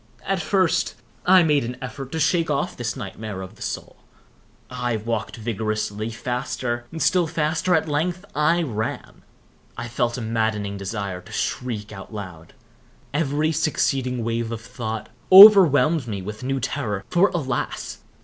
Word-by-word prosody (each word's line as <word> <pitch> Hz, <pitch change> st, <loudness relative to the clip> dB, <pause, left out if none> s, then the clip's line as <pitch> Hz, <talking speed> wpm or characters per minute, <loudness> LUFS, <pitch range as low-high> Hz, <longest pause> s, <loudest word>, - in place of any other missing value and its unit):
At 195 Hz, -1 st, 0 dB
first, 190 Hz, -1 st, +1 dB, 0.3 s
I 185 Hz, -1 st, +7 dB
made 150 Hz, -4 st, +2 dB
an 120 Hz, +1 st, -5 dB
effort 130 Hz, +1 st, -7 dB
to 160 Hz, -, -2 dB
shake 165 Hz, +2 st, +2 dB
off 145 Hz, -1 st, -1 dB
this 120 Hz, -1 st, -3 dB
nightmare 100 Hz, -1 st, -6 dB
of 95 Hz, -, -10 dB
the -, -, -20 dB
soul. -, -, -5 dB, 0.7 s
I 125 Hz, -2 st, -2 dB
walked 110 Hz, +1 st, -3 dB
vigorously—faster—still 120 Hz, -, -2 dB
faster—at 160 Hz, +1 st, +1 dB
length 175 Hz, +5 st, -1 dB
I 170 Hz, +3 st, +2 dB
ran. 110 Hz, -6 st, -4 dB, 0.6 s
I 120 Hz, -, -4 dB
felt 120 Hz, 0 st, -1 dB
a -, -, -4 dB
maddening 110 Hz, -3 st, -1 dB
desire 100 Hz, -2 st, -4 dB
to -, -, -15 dB
shriek 110 Hz, -5 st, -3 dB
aloud. 95 Hz, -5 st, -9 dB, 0.6 s
Every 150 Hz, +1 st, +1 dB
succeeding 135 Hz, -5 st, 0 dB
wave 115 Hz, 0 st, -2 dB
of 115 Hz, -1 st, -5 dB
thought 110 Hz, -2 st, -5 dB, 0.2 s
overwhelmed 170 Hz, -, +9 dB
me 100 Hz, -4 st, -4 dB
with 105 Hz, +2 st, -7 dB
new 135 Hz, +1 st, -1 dB
terror, 115 Hz, -6 st, -3 dB
for, 180 Hz, +3 st, +5 dB
alas! 135 Hz, -8 st, -3 dB
120 Hz, 135 wpm, -23 LUFS, 110-155 Hz, 0.7 s, overwhelmed